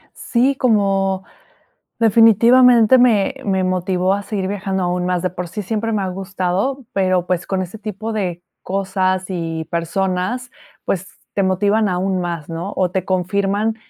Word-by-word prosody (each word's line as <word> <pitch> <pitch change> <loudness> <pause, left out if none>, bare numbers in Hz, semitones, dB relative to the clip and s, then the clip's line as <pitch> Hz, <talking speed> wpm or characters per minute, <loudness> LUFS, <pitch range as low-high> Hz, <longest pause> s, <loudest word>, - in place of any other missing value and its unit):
Sí, 260 +3 +1
como 195 -5 +1 0.8
definitivamente 230 +2 +6
me 245 +1 +3
me 190 -2 0
motivó 185 0 0
a 205 - -3
seguir 195 -2 -3
viajando 195 -1 -2
aún 180 0 -1
más. 180 -1 0
De 185 - 0
por 180 -1 -6
sí 210 +4 -5
siempre 225 +3 -2
me 205 - 0
ha 190 - -2
gustado, 190 +7 -2
pero, 185 -2 +1
pues, 180 -1 -1
con 190 -1 -1
ese 185 +4 -8
tipo 215 +1 -5
de 180 -5 -3 0.2
cosas 190 -1 -1
y 165 -3 -3
personas, 185 +8 -2 0.3
pues, 190 0 -2 0.3
te 200 - +1
motivan 205 +3 +2
aún 185 +1 -1
más, 170 -3 -4
¿no? 170 +4 -5
O, 180 -2 +1
te 185 -1 -2
confirman 200 +4 0
190 Hz, 155 wpm, -19 LUFS, 180-215 Hz, 0.8 s, definitivamente